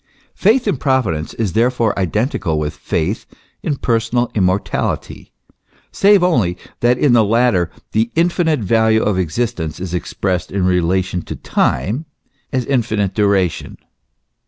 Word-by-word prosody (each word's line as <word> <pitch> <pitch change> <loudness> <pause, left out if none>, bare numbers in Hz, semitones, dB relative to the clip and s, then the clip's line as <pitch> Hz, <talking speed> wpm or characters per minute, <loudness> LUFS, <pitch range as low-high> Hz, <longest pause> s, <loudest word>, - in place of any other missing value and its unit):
Faith 225 +4 +2
in 195 - +1
Providence 125 - -1
is 110 -6 -2
therefore 115 -1 +2
identical 95 - -1
with 75 -1 -2
faith 95 +8 -2 0.3
in 150 - -1
personal 120 0 0
immortality; 95 -1 -1 0.6
save 200 -2 +4
only, 110 - +2 0.2
that 120 +1 +3
in 135 -1 +3
the 115 -2 +5
latter 110 -4 +2 0.2
the 110 +2 +1
infinite 165 -3 +1
value 110 +1 +2
of 100 -3 +1
existence 90 -2 -2
is 90 -1 -5
expressed 90 +1 -2
in 95 -2 0
relation 90 0 +1
to - - -7
time, 110 - -1 0.5
as 130 -3 -1
infinite 110 -7 0
duration. 100 -5 0
110 Hz, 130 wpm, -18 LUFS, 90-125 Hz, 0.6 s, the